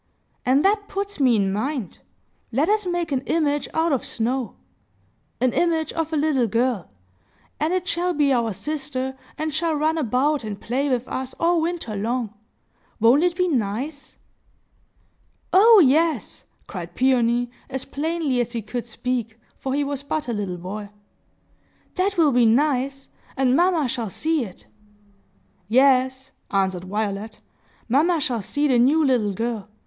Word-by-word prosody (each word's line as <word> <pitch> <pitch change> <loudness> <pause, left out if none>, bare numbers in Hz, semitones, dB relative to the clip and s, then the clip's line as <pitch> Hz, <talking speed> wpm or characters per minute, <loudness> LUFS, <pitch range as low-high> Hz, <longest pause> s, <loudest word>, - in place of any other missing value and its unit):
And 270 +6 +4
that 410 +1 +2
puts 400 -2 -4
me 255 -4 +4
in 195 -2 +1
mind! 245 - -3 0.5
Let 280 - +1
us 420 -2 +1
make 350 -2 -2
an 265 -2 0
image 295 -3 +1
out 325 +1 +1
of 270 - 0
snow,—an 250 +1 -5
image 325 -3 +1
of 325 -1 -2
a 315 - 0
little 285 -5 +2
girl,—and 195 - -4
it 365 0 -1
shall 355 -1 0
be 290 -4 +2
our 235 -3 +1
sister, 265 +3 -4 0.2
and 310 0 -2
shall 320 +1 0
run 315 +2 +1
about 275 +2 +1
and 205 -2 -5
play 270 +5 -1
with 250 -1 -1
us 260 0 -5
all 340 0 +3
winter 325 -10 -3
long. 225 +1 -2 0.7
Won't 235 +6 +5
it 350 0 +2
be 365 0 +1
nice?" 265 - -3 1.4
"Oh 435 +3 +8
yes!" 305 -1 +1 0.2
cried 175 -2 -7
Peony, 245 -2 +2 0.2
as 265 0 -4
plainly 305 -4 -1
as 240 0 -3
he 230 -2 -3
could 240 +2 -5
speak, 235 -1 -3 0.2
for 265 0 -2
he 290 - +1
was 280 -1 -3
but 295 +1 -3
a 240 - -1
little 200 -4 -3
boy. 200 +4 -6 1.0
"That 390 +1 0
will 315 -4 +4
be 245 -2 +4
nice! 270 +2 +1 0.3
And 260 -1 +3
mamma 345 -3 +3
shall 230 -3 -3
see 310 - 0
it!" 185 - -13 1.0
"Yes," 260 +2 +3 0.2
answered 190 -2 0
Violet; 210 +2 -3 0.5
"mamma 315 +8 +3
shall 255 -7 -1
see 290 +9 0
the 255 -4 +3
new 295 +6 +4
little 235 -7 +2
girl. 225 -1 -3
265 Hz, 150 wpm, -23 LUFS, 230-310 Hz, 1.4 s, Oh